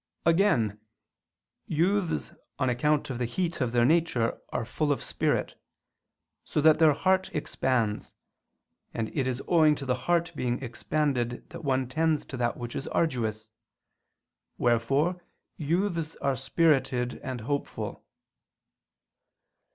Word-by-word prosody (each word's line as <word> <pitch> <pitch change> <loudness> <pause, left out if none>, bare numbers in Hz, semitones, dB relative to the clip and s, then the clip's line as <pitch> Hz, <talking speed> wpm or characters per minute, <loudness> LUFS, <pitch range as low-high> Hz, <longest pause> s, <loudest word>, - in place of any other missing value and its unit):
Again, 165 - +3 0.9
youths, 170 - 0 0.3
on 130 -1 +1
account 145 +4 +1
of 125 - -4
the 125 - 0
heat 170 +7 -2
of 125 -2 +1
their 120 0 +3
nature, 155 -6 +2
are 115 - -2
full 150 +5 -1
of 135 - -1
spirit; - - -1 0.8
so - - -2
that 155 +1 +5
their 155 -2 +6
heart 190 +5 +1
expands: 125 -7 -1 0.8
and 110 -1 -3
it 135 -3 +1
is 130 0 -2
owing 155 -3 +5
to 140 - -6
the 130 - +1 0.2
heart 170 0 +2
being 125 -2 -1
expanded 125 -1 -1
that - - -8
one 130 -2 +1
tends 155 +3 +1
to 130 - -7
that 120 -1 0
which 120 -1 -6
is 135 - -4
arduous; 110 -8 -1 1.1
wherefore 135 +9 +1 0.3
youths 165 +1 -1
are 140 -1 0
spirited 130 -3 +1
and 130 -3 -5
hopeful. 140 +5 -4
135 Hz, 130 wpm, -28 LUFS, 120-160 Hz, 1.1 s, their